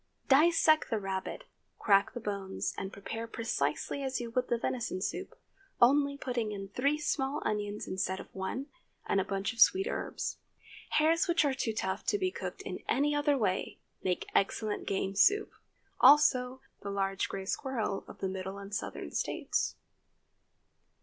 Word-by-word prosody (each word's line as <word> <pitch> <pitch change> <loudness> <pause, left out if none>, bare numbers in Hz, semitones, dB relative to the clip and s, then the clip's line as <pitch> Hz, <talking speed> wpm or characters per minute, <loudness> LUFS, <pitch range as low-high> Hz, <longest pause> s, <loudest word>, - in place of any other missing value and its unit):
Dissect 310 +2 +5
the 225 - +1
rabbit, 195 - -4 0.3
crack 200 +2 +3
the - - -3
bones, 200 -3 -3
and 190 - -5
prepare 225 +3 -6
precisely 225 - -2
as 265 -1 -1
you 235 -1 -5
would 250 +2 0
the 240 - +1
venison 235 -4 -2
soup, 185 - -4 0.4
only 280 +3 +4
putting 245 -5 -2
in 195 -1 -6
three 280 +8 +1
small 290 -1 -1
onions 210 0 -2
instead 190 0 -2
of - - -11
one, 190 +8 -3 0.4
and 195 - +2
a - - -1
bunch 195 +3 -2
of 230 - -13
sweet 380 +11 +6
herbs. - - -3 0.6
Hares 320 +2 +3
which 340 -3 +3
are 280 - +2
too 260 -4 -1
tough 190 -2 -2
to 410 - +3
be 370 -2 0
cooked - - -6
in - - -5
any 290 +2 +2
other 290 -1 +2
way, 195 -6 -1 0.2
make 180 -1 -1
excellent 210 +2 0
game 195 0 -1
soup. 410 - +4 0.5
Also, 260 -2 +5 0.2
the 200 - -5
large 195 -1 -1
gray 195 -1 -5
squirrel 220 -3 -2
of - - -12
the 190 - 0
Middle 190 +1 -5
and 200 0 -9
Southern - - -4
States. - - -1
225 Hz, 165 wpm, -31 LUFS, 195-280 Hz, 0.6 s, sweet